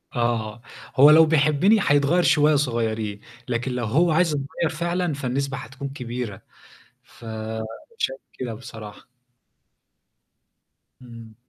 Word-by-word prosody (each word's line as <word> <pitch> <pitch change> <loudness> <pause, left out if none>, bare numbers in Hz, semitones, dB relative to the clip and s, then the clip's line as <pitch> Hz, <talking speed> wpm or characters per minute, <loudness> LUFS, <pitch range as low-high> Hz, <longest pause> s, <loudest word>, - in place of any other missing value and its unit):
آه، 120 -2 -1 0.3
هو 140 +3 +8
لو 160 +1 +8
بيحبني 155 +7 +3
هيتغيّر 145 +5 +3
شوية 150 0 +4
صغيرين 110 -6 -1 0.3
لكن 125 +1 -2
لو 125 -1 -2
هو 160 +10 +2
عايز 165 +2 +3
يتغيّر 145 +3 -2
فعلًا 175 -1 -1
فالنسبة 135 0 -2
هتكون 135 +4 -7
كبيرة. 120 -6 -6 0.6
فأنا 110 -1 -7 0.3
شايف - - -2 0.2
كده 120 -3 -4
بصراحة. 110 +1 -11 1.9
امم. 115 -2 -12
130 Hz, 110 wpm, -23 LUFS, 115-150 Hz, 1.9 s, هو